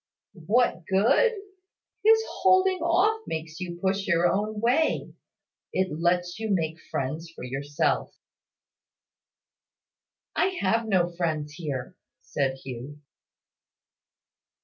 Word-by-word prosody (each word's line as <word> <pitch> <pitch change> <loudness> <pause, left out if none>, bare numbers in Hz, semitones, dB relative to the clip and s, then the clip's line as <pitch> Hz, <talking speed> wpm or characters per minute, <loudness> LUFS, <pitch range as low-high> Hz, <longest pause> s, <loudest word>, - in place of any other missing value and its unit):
"What 230 -5 +2
good? 235 - +4 0.7
His 445 +1 +6 0.2
holding 375 0 +4
off 365 +7 +2
makes 160 +1 -5
you 175 -2 -5
push 195 +1 0
your 170 -2 +3
own 210 +4 -1
way. 250 +8 +1 0.6
It 185 -4 0
lets 175 +2 +1
you 220 -1 -3
make 165 -4 0
friends 155 +5 -3
for - - -9
yourself." 140 +3 -1 2.2
"I 375 0 +1
have 225 +4 +1
no 185 -4 +3
friends 155 -4 -1
here," 150 -1 -5 0.3
said 135 -2 -1
Hugh. 135 +3 -7
180 Hz, 105 wpm, -26 LUFS, 160-235 Hz, 2.2 s, His